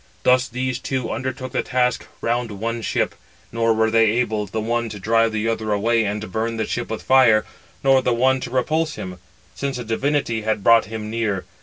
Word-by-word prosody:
Thus 125 Hz, 0 st, +4 dB
these 125 Hz, +1 st, -3 dB
two 130 Hz, -2 st, -3 dB
undertook 130 Hz, 0 st, -4 dB
the -, -, 0 dB
task 125 Hz, -1 st, 0 dB
round 120 Hz, 0 st, 0 dB
one 115 Hz, +3 st, -3 dB
ship, -, -, 0 dB, 0.4 s
nor 115 Hz, 0 st, +1 dB
were 110 Hz, 0 st, +2 dB
they 115 Hz, 0 st, +5 dB
able, 110 Hz, -3 st, 0 dB
the 110 Hz, +3 st, -3 dB
one 115 Hz, +1 st, -1 dB
to 105 Hz, -, -7 dB
drive 115 Hz, +2 st, +2 dB
the 110 Hz, +1 st, -1 dB
other 110 Hz, -1 st, -1 dB
away 115 Hz, +2 st, +2 dB
and 105 Hz, 0 st, -3 dB
burn 115 Hz, +3 st, -2 dB
the 110 Hz, -, -1 dB
ship 120 Hz, -, -3 dB
with 110 Hz, -, -4 dB
fire, 120 Hz, -5 st, +5 dB, 0.4 s
nor 135 Hz, -1 st, +5 dB
the 125 Hz, -, 0 dB
other 130 Hz, +2 st, +3 dB
to -, -, -5 dB
repulse 155 Hz, +5 st, 0 dB
him, 90 Hz, -1 st, -7 dB, 0.3 s
since 140 Hz, -2 st, -3 dB
a 125 Hz, -, -4 dB
divinity 115 Hz, 0 st, 0 dB
had 110 Hz, -2 st, -1 dB
brought 115 Hz, +1 st, +6 dB
him 110 Hz, 0 st, -6 dB
near. 110 Hz, -5 st, -1 dB
115 Hz, 200 wpm, -22 LUFS, 110-125 Hz, 0.4 s, brought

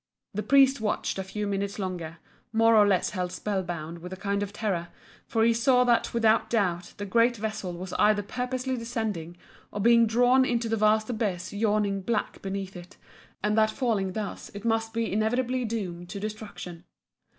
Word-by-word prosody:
The 210 Hz, -, -2 dB
priest 270 Hz, 0 st, +4 dB
watched 210 Hz, -2 st, -1 dB
a -, -, -1 dB
few 210 Hz, +2 st, -4 dB
minutes 200 Hz, 0 st, -2 dB
longer, 175 Hz, -5 st, -4 dB, 0.3 s
more 225 Hz, 0 st, +4 dB
or 210 Hz, -1 st, +6 dB
less 190 Hz, -3 st, +2 dB
held 180 Hz, -2 st, -3 dB
spell 195 Hz, +1 st, -2 dB
bound 170 Hz, -2 st, -6 dB
with 180 Hz, +2 st, -9 dB
a -, -, -4 dB
kind 200 Hz, +1 st, -1 dB
of 205 Hz, -1 st, -3 dB
terror, 200 Hz, -5 st, -2 dB, 0.4 s
for 225 Hz, -1 st, +1 dB
he 230 Hz, +1 st, +5 dB
saw 250 Hz, +2 st, +4 dB
that 240 Hz, -2 st, +2 dB
without 225 Hz, -1 st, +3 dB
doubt 180 Hz, -6 st, -1 dB
the 205 Hz, -, -4 dB
great 235 Hz, +4 st, +3 dB
vessel 210 Hz, -4 st, -4 dB
was 180 Hz, +1 st, -7 dB
either 210 Hz, 0 st, +4 dB
purposely 255 Hz, +3 st, -3 dB
descending 220 Hz, -8 st, -4 dB, 0.3 s
or 205 Hz, -, -5 dB
being 235 Hz, +2 st, +5 dB
drawn 245 Hz, +4 st, +4 dB
into 240 Hz, -2 st, 0 dB
the 225 Hz, -, 0 dB
vast 215 Hz, +1 st, +2 dB
abyss 200 Hz, -6 st, -2 dB
yawning 205 Hz, -2 st, +1 dB
black 215 Hz, +2 st, -2 dB
beneath 195 Hz, 0 st, -4 dB
it, 180 Hz, +1 st, -11 dB, 0.5 s
and 210 Hz, 0 st, +2 dB
that 215 Hz, 0 st, +4 dB
falling 215 Hz, -6 st, -1 dB
thus 210 Hz, -1 st, -5 dB
it 205 Hz, -, -7 dB
must 225 Hz, 0 st, +1 dB
be 230 Hz, -2 st, -2 dB
inevitably 245 Hz, +4 st, 0 dB
doomed 180 Hz, -6 st, -4 dB
to 200 Hz, +1 st, -5 dB
destruction. 205 Hz, -5 st, -7 dB
210 Hz, 185 wpm, -27 LUFS, 190-230 Hz, 0.5 s, or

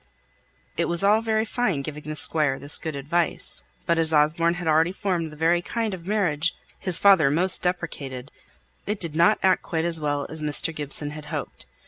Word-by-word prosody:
It -, -, 0 dB
was 170 Hz, +2 st, +2 dB
all 210 Hz, +2 st, +3 dB
very 220 Hz, -1 st, -1 dB
fine 210 Hz, -, -2 dB
giving 150 Hz, +1 st, -8 dB
the 155 Hz, 0 st, -7 dB
Squire 150 Hz, -3 st, +1 dB
this 145 Hz, +2 st, +2 dB
good 160 Hz, -3 st, -6 dB
advice; 155 Hz, +5 st, -1 dB, 0.2 s
but 170 Hz, -1 st, 0 dB
as 160 Hz, -1 st, +4 dB
Osborne 160 Hz, +3 st, +1 dB
had 175 Hz, -1 st, -6 dB
already 160 Hz, +2 st, +2 dB
formed 180 Hz, -4 st, -3 dB
the -, -, -12 dB
very 165 Hz, +3 st, +1 dB
kind 225 Hz, +2 st, -4 dB
of 175 Hz, -1 st, -10 dB
marriage 180 Hz, -6 st, -1 dB, 0.2 s
his 180 Hz, -3 st, +1 dB
father 190 Hz, -8 st, +4 dB
most 175 Hz, +6 st, +5 dB
deprecated, 145 Hz, -7 st, -5 dB, 0.6 s
it 210 Hz, 0 st, -3 dB
did 165 Hz, -3 st, -1 dB
not 170 Hz, +6 st, +3 dB
act 190 Hz, -1 st, +2 dB
quite 165 Hz, -1 st, -4 dB
as 170 Hz, -1 st, +7 dB
well 145 Hz, -2 st, -3 dB
as 160 Hz, 0 st, -5 dB
Mr. 150 Hz, +2 st, +2 dB
Gibson 145 Hz, 0 st, -1 dB
had 150 Hz, 0 st, -10 dB
hoped. -, -, -8 dB
165 Hz, 190 wpm, -23 LUFS, 150-185 Hz, 0.6 s, as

